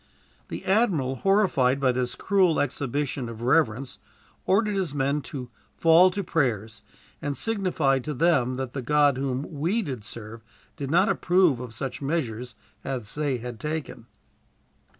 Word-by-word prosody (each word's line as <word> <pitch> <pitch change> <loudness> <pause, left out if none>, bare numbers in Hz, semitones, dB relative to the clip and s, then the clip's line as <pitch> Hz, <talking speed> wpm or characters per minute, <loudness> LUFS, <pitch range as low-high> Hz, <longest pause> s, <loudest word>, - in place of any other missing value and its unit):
The - - -7
admiral, 185 - +2
horrified 170 - +2
by 135 -2 +3
this 125 0 -2
cruel 185 -4 +2
exhibition 140 -2 -2
of 115 0 -8
reverence, 130 -2 +1 0.5
ordered 210 +2 +3
his 185 -7 -2
men 140 +1 0
to 125 -4 -7 0.3
fall 165 +3 +6
to 200 +2 -3
prayers; 110 - -1 0.4
and 145 -1 -3
signified 175 - +1
to 150 - -3
them 130 -5 +2
that 130 -1 -4
the 135 - -3
God 145 +1 +3
whom 135 0 -2
we 195 +10 +1
did 130 - -5
serve 115 0 -8 0.3
did 140 -3 -5
not 165 - +4
approve 175 -7 +3
of 120 -3 -7
such 135 +5 -4
measures 125 -5 -3 0.3
as 120 -6 -5
they 145 -3 -1
had 120 -1 -7
taken. 150 -5 -5
140 Hz, 150 wpm, -26 LUFS, 125-165 Hz, 0.5 s, fall